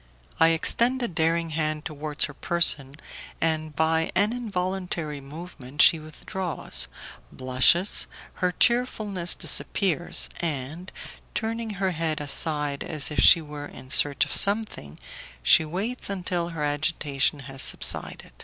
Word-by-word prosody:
I 165 Hz, -, +6 dB
extend 235 Hz, +10 st, +3 dB
a -, -, 0 dB
daring 165 Hz, -1 st, -1 dB
hand 155 Hz, -1 st, -3 dB
towards 150 Hz, 0 st, 0 dB
her 150 Hz, -, -9 dB
person, 145 Hz, -4 st, +1 dB, 0.4 s
and 155 Hz, -2 st, -2 dB
by 160 Hz, +1 st, +1 dB
an 205 Hz, +4 st, +2 dB
involuntary 180 Hz, -, -4 dB
movement 145 Hz, -2 st, -11 dB
she 165 Hz, -, +7 dB
withdraws, 155 Hz, +3 st, -3 dB, 0.4 s
blushes, 130 Hz, +9 st, +2 dB, 0.3 s
her 180 Hz, -1 st, +1 dB
cheerfulness 210 Hz, -5 st, +1 dB
disappears, 175 Hz, -3 st, 0 dB
and, 160 Hz, +2 st, -5 dB, 0.4 s
turning 225 Hz, -1 st, -3 dB
her 195 Hz, -1 st, -1 dB
head 160 Hz, -2 st, -3 dB
aside 145 Hz, -1 st, -1 dB
as 155 Hz, -1 st, -1 dB
if 150 Hz, -, -2 dB
she 165 Hz, -, +7 dB
were 145 Hz, -1 st, -8 dB
in 130 Hz, -, -12 dB
search 140 Hz, -2 st, +5 dB
of -, -, -5 dB
something, 200 Hz, -, +1 dB, 0.5 s
she 160 Hz, -, +5 dB
waits 200 Hz, +11 st, -5 dB
until 180 Hz, -3 st, -3 dB
her 165 Hz, -3 st, -5 dB
agitation 145 Hz, -1 st, -1 dB
has 135 Hz, 0 st, -7 dB
subsided. -, -, 0 dB
160 Hz, 125 wpm, -25 LUFS, 150-185 Hz, 0.5 s, she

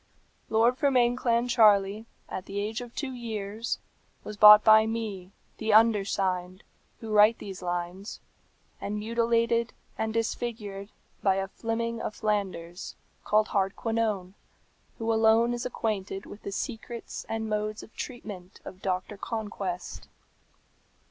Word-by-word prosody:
"Lord 230 Hz, +3 st, +3 dB
Fermain 250 Hz, -4 st, +3 dB
Clancharlie, 225 Hz, -4 st, +3 dB, 0.2 s
at 185 Hz, -, -6 dB
the 200 Hz, +1 st, -3 dB
age 220 Hz, +3 st, -3 dB
of 240 Hz, -1 st, -10 dB
two 280 Hz, -3 st, -3 dB
years, 225 Hz, -2 st, -4 dB, 0.5 s
was 210 Hz, -, -7 dB
bought 210 Hz, 0 st, +10 dB
by 220 Hz, 0 st, +7 dB
me, 210 Hz, -5 st, -4 dB, 0.3 s
the 220 Hz, -1 st, +1 dB
undersigned, 195 Hz, -4 st, +2 dB, 0.4 s
who 225 Hz, -1 st, -6 dB
write 215 Hz, +2 st, +6 dB
these 195 Hz, -2 st, -8 dB
lines, 175 Hz, +3 st, -4 dB, 0.6 s
and 210 Hz, +1 st, -3 dB
mutilated 230 Hz, +1 st, +1 dB, 0.3 s
and 220 Hz, 0 st, 0 dB
disfigured 220 Hz, -3 st, -3 dB, 0.3 s
by 195 Hz, -2 st, +3 dB
a 195 Hz, 0 st, -1 dB
Fleming 230 Hz, +3 st, -3 dB
of 215 Hz, -, -4 dB
Flanders, 190 Hz, -5 st, -3 dB, 0.3 s
called 215 Hz, +1 st, +2 dB
Hardquanonne, 200 Hz, -1 st, -1 dB, 0.6 s
who 225 Hz, 0 st, 0 dB
alone 225 Hz, +2 st, +4 dB
is 240 Hz, 0 st, -2 dB
acquainted 205 Hz, -5 st, -3 dB
with 205 Hz, -, -11 dB
the 200 Hz, -, -6 dB
secrets 235 Hz, +2 st, -5 dB
and 225 Hz, 0 st, -2 dB
modes 215 Hz, 0 st, -2 dB
of 220 Hz, -, -15 dB
treatment 205 Hz, -7 st, -8 dB
of 185 Hz, -, -10 dB
Doctor 185 Hz, +2 st, -2 dB
Conquest. 200 Hz, -5 st, -5 dB
215 Hz, 125 wpm, -28 LUFS, 195-230 Hz, 0.6 s, bought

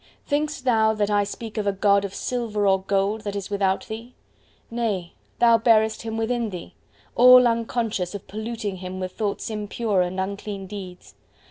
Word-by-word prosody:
Thinkest 295 Hz, -1 st, -1 dB
thou 220 Hz, -3 st, +3 dB
that 210 Hz, -1 st, 0 dB
I 205 Hz, 0 st, +3 dB
speak 220 Hz, +2 st, -6 dB
of 205 Hz, -, -2 dB
a -, -, +4 dB
God 200 Hz, +1 st, +3 dB
of 195 Hz, -1 st, -5 dB
silver 225 Hz, -4 st, -2 dB
or 190 Hz, -1 st, +3 dB
gold, 200 Hz, +3 st, 0 dB
that 205 Hz, -1 st, -5 dB
is 200 Hz, 0 st, -5 dB
without 195 Hz, -1 st, 0 dB
thee? 230 Hz, +3 st, -8 dB, 0.6 s
Nay, 210 Hz, -7 st, -2 dB, 0.2 s
thou 235 Hz, -1 st, +5 dB
bearest 220 Hz, -1 st, +3 dB
Him 225 Hz, -1 st, -4 dB
within 230 Hz, 0 st, -1 dB
thee! 180 Hz, -3 st, -8 dB, 0.4 s
all 250 Hz, 0 st, +8 dB
unconscious 225 Hz, -5 st, -1 dB
of 200 Hz, -, -8 dB
polluting 215 Hz, -2 st, -4 dB
Him 185 Hz, 0 st, -6 dB
with 185 Hz, 0 st, -4 dB
thoughts 210 Hz, +1 st, -3 dB
impure 210 Hz, -1 st, -1 dB
and 180 Hz, +1 st, -2 dB
unclean 200 Hz, +1 st, -4 dB
deeds. 185 Hz, -2 st, -9 dB
210 Hz, 170 wpm, -24 LUFS, 195-230 Hz, 0.6 s, all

